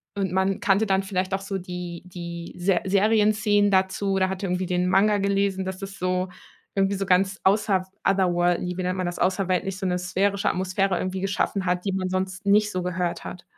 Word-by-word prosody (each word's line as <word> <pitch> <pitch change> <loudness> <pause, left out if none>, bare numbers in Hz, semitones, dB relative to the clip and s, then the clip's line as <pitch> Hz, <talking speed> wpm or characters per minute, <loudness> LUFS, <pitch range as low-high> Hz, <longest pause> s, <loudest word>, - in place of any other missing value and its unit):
und 195 -3 -1
man 190 +1 +1
kannte 210 0 +2
dann 195 -1 +1
vielleicht 190 -1 -2
auch 195 - +1
so 195 0 -3
die 180 -1 -6
die 170 -1 -7
Ser 180 0 +1
Serienszenen 210 +1 +3
dazu 190 +1 +1
oder 190 -1 +2
hatte 190 +1 -4
irgendwie 180 0 -1
den 180 0 0
Manga 205 +2 +4
gelesen, 195 -1 +1
dass 190 0 -4
das 195 -2 -7
so 185 0 0 0.5
irgendwie 195 0 +2
so 195 - -2
ganz 190 +1 +2
außer 195 -2 +2 0.2
otherworld 175 -2 +2
lie 180 0 -4
wie 185 - -2
nennt 180 +1 -1
man 185 - -1
das, 175 - -4
außerweltlich, 190 0 0
so 190 - -4
'ne 180 -1 +1
sphärische 195 +3 0
Atmosphäre 190 +1 0
irgendwie 185 0 -3
geschaffen 195 0 -1
hat, 180 +1 0
die 195 - 0
man 185 -1 -1
sonst 185 +1 -3
nicht 210 +1 +4
so 185 - -2
gehört 180 -1 -2
hat. 180 - -8
190 Hz, 205 wpm, -25 LUFS, 180-195 Hz, 0.5 s, Manga